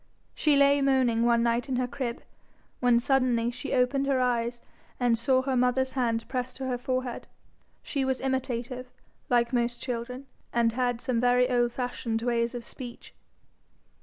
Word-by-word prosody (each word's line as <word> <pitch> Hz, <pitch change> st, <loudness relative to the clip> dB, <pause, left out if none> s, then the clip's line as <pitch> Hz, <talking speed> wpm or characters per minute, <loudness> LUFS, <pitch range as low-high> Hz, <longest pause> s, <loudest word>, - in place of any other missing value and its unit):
She 300 Hz, -2 st, +2 dB
lay 280 Hz, 0 st, +5 dB
moaning 255 Hz, -4 st, +3 dB
one 235 Hz, -1 st, +3 dB
night 235 Hz, +3 st, 0 dB
in 260 Hz, -, 0 dB
her 250 Hz, 0 st, +1 dB
crib, 245 Hz, -2 st, -4 dB, 0.6 s
when 245 Hz, -1 st, +4 dB
suddenly 250 Hz, -2 st, +2 dB
she 255 Hz, +3 st, -6 dB
opened 270 Hz, +2 st, +2 dB
her 270 Hz, -2 st, +2 dB
eyes 240 Hz, -1 st, 0 dB, 0.4 s
and 245 Hz, -2 st, +3 dB
saw 260 Hz, +3 st, +2 dB
her 265 Hz, -1 st, 0 dB
mother's 250 Hz, +1 st, +2 dB
hand 230 Hz, -3 st, 0 dB
pressed 255 Hz, -1 st, -3 dB
to 265 Hz, -, -4 dB
her 250 Hz, -1 st, -2 dB
forehead. 255 Hz, -1 st, -3 dB, 0.6 s
She 275 Hz, -2 st, -2 dB
was 265 Hz, -1 st, 0 dB
imitative, 255 Hz, -1 st, -3 dB, 0.4 s
like 240 Hz, 0 st, +2 dB
most 240 Hz, 0 st, 0 dB
children, 250 Hz, +1 st, -5 dB, 0.3 s
and 235 Hz, -1 st, +2 dB
had 245 Hz, 0 st, -1 dB
some 240 Hz, -3 st, 0 dB
very 250 Hz, 0 st, +4 dB
old 240 Hz, -1 st, +2 dB
fashioned 235 Hz, -2 st, -3 dB
ways 235 Hz, 0 st, 0 dB
of 240 Hz, -, -5 dB
speech. 245 Hz, 0 st, -10 dB
250 Hz, 165 wpm, -28 LUFS, 235-260 Hz, 0.6 s, lay